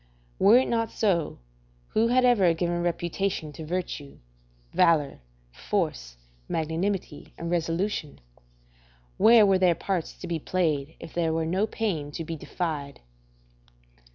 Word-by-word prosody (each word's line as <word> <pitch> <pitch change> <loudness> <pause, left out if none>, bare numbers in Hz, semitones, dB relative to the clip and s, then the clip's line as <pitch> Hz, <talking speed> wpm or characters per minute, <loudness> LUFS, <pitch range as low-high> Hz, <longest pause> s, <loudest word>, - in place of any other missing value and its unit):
Were 210 +5 +7
it 260 - +2
not 230 -1 0
so, 180 -8 0 0.5
who 225 +1 +2
had 250 +1 +3
ever 195 -9 +4
given 175 +1 -1
reputation 175 -1 -2
to 160 - -8
virtue; 155 -4 -4 0.6
valour, 165 -6 +3 0.3
force, - - -3 0.3
magnanimity, 165 +1 -3
and 170 0 -4
resolution? 170 -1 -2 1.0
where 225 -1 +7
were 195 -2 +3
their 180 -2 +4
parts 185 -3 -2
to - - -10
be 170 -2 -2
played 155 -4 -1
if - - -10
there 165 -2 0
were 160 0 0
no 190 +6 0
pain 185 -11 -2
to 165 - -4
be 165 +1 -5
defied? 150 -4 -4
175 Hz, 130 wpm, -26 LUFS, 160-195 Hz, 1.0 s, Were